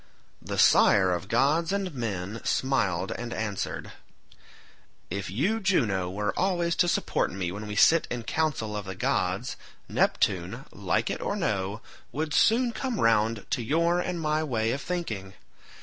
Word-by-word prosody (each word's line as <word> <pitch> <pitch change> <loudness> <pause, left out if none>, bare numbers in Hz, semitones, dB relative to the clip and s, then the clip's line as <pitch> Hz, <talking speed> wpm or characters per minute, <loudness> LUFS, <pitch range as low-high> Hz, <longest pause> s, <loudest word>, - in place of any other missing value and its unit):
The - - -5
sire 95 -3 +5
of 90 +2 -4
gods 155 - +2
and 195 -3 -2
men 110 -4 -4
smiled 100 -9 0
and 120 0 -5
answered, 105 -4 -3 1.2
"If 100 0 -3
you, 175 - 0
Juno, 110 - +1
were 105 +2 -2
always 175 -3 +1
to 175 - +4
support 170 - 0
me 90 -2 -3
when 105 +3 -6
we 105 - -5
sit 160 +10 +5
in 120 -1 -4
council 135 -8 -1
of 105 -1 -4
the 95 0 -6
gods, 95 +5 -1 0.3
Neptune, 95 - 0
like 100 -3 -1
it - - -4
or - - -1
no, 100 +1 -2 0.3
would 155 +1 -3
soon 235 +6 +4
come 240 -2 -3
round 115 -1 +2
to 130 - 0
your 170 +8 +2
and 180 -1 -2
my 155 0 0
way 115 -6 0
of 140 - -2
thinking. 110 - -4
115 Hz, 155 wpm, -27 LUFS, 100-165 Hz, 1.2 s, sire